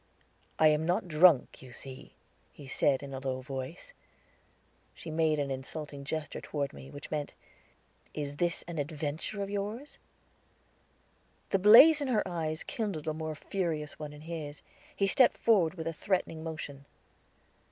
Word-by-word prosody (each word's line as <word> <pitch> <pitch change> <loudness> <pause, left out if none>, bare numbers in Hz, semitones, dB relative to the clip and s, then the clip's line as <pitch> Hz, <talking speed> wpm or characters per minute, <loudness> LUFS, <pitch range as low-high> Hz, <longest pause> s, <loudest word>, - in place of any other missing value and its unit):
"I 155 - +6
am 150 +1 +2
not 175 +2 0
drunk, 160 -3 +4
you 130 -1 -12
see," 130 +2 -10 0.4
he 140 - -12
said 135 +1 +2
in 140 -1 -7
a 135 - -4
low 130 -1 -3
voice. 135 - -6 1.0
She 160 - -8
made 155 -1 +2
an 140 -2 -1
insulting 140 +1 -6
gesture 155 +1 -4
toward 140 -2 -3
me, 135 - -11
which 145 +1 -10
meant, 150 -2 -3 0.8
"Is 145 -1 -5
this 175 +1 0
an 170 -3 -4
adventure 155 +6 -3
of 195 - -5
yours?" 210 +8 -4 1.5
The 195 - +3
blaze 260 - +9
in 285 - -1
her 220 -6 +1
eyes 160 -2 -3
kindled 195 -10 -4
a 155 - 0
more 155 0 -4
furious 155 -3 -3
one 150 -1 -6
in 150 0 -12
his; 155 -3 -6 0.3
he 200 - +2
stepped 255 +6 +5
forward 190 -7 +3
with 160 -3 -5
a 165 - -2
threatening 165 -2 -1
motion. 145 -4 -6
155 Hz, 155 wpm, -31 LUFS, 145-180 Hz, 1.5 s, blaze